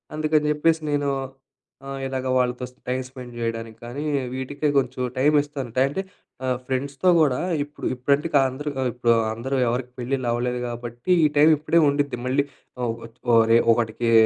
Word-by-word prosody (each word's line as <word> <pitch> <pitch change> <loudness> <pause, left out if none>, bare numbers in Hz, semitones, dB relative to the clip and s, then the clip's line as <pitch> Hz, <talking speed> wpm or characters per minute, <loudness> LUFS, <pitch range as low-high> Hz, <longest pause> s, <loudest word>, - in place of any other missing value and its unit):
అందుకని 155 0 +1
చెప్పేసి 160 +2 +2
నేను 145 -1 +1 0.8
ఆహ్, 135 0 -5
ఇలాగ 130 -1 -3
వాళ్ళతో 125 0 0
స్ - - -27
టైమ్ 130 +1 0
స్పెండ్ 125 -2 -10
చేయడానికి 115 -1 -4
కానీ, 130 +5 -5 0.3
వీటికె 140 +3 -2
కొంచెం 130 -1 0 0.2
టైం 145 +4 +4
ఇస్తాను. 140 -4 -6
టై 130 - +5
అంటే, 170 +7 -2 0.4
ఆహ్, 130 -1 +1
ఫ్రెండ్స్‌తో 140 +6 0
గూడా 140 -5 +3 0.2
ఇప్పుడు 145 +1 -9
ఇప్పుడంటే 140 +5 +1
కా 140 - +7
అందరు, 145 +3 -5 0.2
ఇప్పుడు 120 -1 +2 0.2
అందరూ 130 +5 -3
ఎవరికీ 125 +1 -2
పెళ్లిళ్లు 130 +1 -2
అవ్వలేదు 125 +1 -1
కాబట్టి 120 +6 -5
ఈ - - +7
టైం 150 +2 +7
ఇప్పుడే 160 +3 +2
ఉండిద్ది 140 -3 -1
మళ్ళీ 135 +2 +2 0.4
ఓహ్, 115 -2 -1 0.2
చ్ - - -34 0.2
ఓహ్, 115 -1 +7
రొ 115 - +7 0.2
ఒకడికీ 115 0 0
130 Hz, 170 wpm, -24 LUFS, 120-145 Hz, 0.8 s, కా